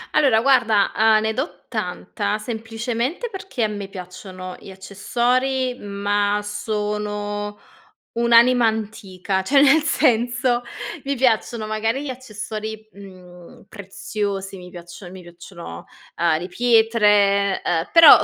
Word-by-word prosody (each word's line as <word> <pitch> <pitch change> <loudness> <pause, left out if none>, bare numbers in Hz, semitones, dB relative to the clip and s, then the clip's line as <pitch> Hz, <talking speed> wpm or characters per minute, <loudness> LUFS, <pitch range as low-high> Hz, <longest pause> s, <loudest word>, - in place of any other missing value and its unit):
Allora, 270 -8 +4
guarda, 230 -6 +3
uhm, 220 0 +4
ne 220 0 -1
do 265 +8 -5
tanta. 205 -1 -3
Semplicemente 230 - -4
perché 380 - -4
a - - +3
me 205 -2 -6
piacciono 185 -1 -9
gli - - -12
accessori. 245 +7 -1
Ma 205 0 -1
sono 205 0 -3 0.5
un'anima 235 +1 +4
antica, 200 -3 -3
cioè, 275 +9 +3
nel 290 +3 +5
senso, 245 -4 +1 0.4
mi 280 0 -1
piacciono 235 -3 +1
magari 220 +5 -2
gli 290 - -5
accessori, 220 -3 -7
mhmm, 180 -3 -14
preziosi, 200 -1 -5
mi 180 -1 -11
piaccio 175 +1 -11
mi 185 0 -11
piacciono, 170 - -11 0.3
uhm, 165 -2 +2
le 175 - -6
pietre, 210 -3 +3
uhm 165 -1 0
però 330 -3 +9
215 Hz, 120 wpm, -21 LUFS, 195-240 Hz, 0.5 s, però